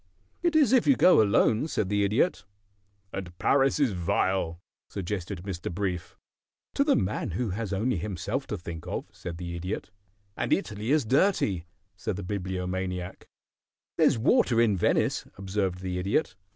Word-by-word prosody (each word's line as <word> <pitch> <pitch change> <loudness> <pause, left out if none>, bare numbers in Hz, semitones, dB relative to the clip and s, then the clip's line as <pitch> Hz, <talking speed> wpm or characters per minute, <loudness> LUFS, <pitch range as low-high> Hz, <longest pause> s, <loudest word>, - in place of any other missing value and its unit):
"It 340 -2 +1
is 285 -6 +5
if 255 - +4
you 275 - +6
go 185 - +6
alone," 110 +5 +3
said 100 -11 -1
the 100 0 +2
Idiot. 110 - +1 0.7
"And 90 -3 -6
Paris 135 +6 +3
is 140 -6 +3
vile," 90 -1 0 0.3
suggested 90 -3 -4
Mr. 95 -4 -4
Brief. 90 -1 -3 0.6
"To 280 - +3
the 285 -1 +3
man 95 - -1
who 100 +4 -2
has 105 +1 -3
only 105 +3 0
himself 105 - -3
to 105 - -3
think 85 -3 -8
of," - - -3
said 85 -2 -7
the 85 0 -5
Idiot. 90 +4 -4 0.4
"And - - -2
Italy 105 +3 -2
is 150 -3 +3
dirty," 110 - +2 0.3
said 100 +3 -3
the 100 - -5
Bibliomaniac. 90 -1 -4 0.7
"There's - - +4
water 125 - +3
in 115 -4 +4
Venice," 90 - +1
observed 95 -1 -2
the 90 -1 -3
Idiot. 100 +12 0
100 Hz, 155 wpm, -27 LUFS, 90-115 Hz, 0.7 s, you